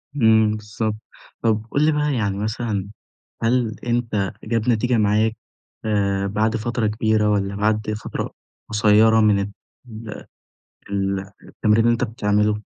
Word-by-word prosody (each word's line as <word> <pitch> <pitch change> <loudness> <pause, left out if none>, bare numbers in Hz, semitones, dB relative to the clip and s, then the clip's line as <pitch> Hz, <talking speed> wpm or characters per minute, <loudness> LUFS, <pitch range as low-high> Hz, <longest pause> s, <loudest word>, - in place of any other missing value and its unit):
إمم 110 -4 +4
بالضبط، 105 +1 -3 0.5
طب 110 -1 +1
قل 145 +2 +2
لي 155 - +4
بقى 150 -1 0
يعني 100 -5 -1
مثلًا، 105 -2 -2 0.5
هل 115 -2 +1
أنتَ 115 -5 0
جاب 115 +1 -1
نتيجة 120 +1 +2
معاك 110 +1 +2 0.5
آآ 100 -2 0
بعد 110 +3 0
فترة 115 0 -1
كبيرة 110 0 +1
والّا 100 -1 0
بعد 105 +1 0
فترة - - -4 0.4
قصيرة 110 +1 +4
من 105 -2 +4
ال 100 +1 -3 1.4
ال 100 -1 -1 0.2
التمرين 105 +1 +1
اللي 120 - +5
أنتَ 115 - -1
بتعمله؟ 105 -2 0
110 Hz, 130 wpm, -22 LUFS, 105-115 Hz, 1.4 s, اللي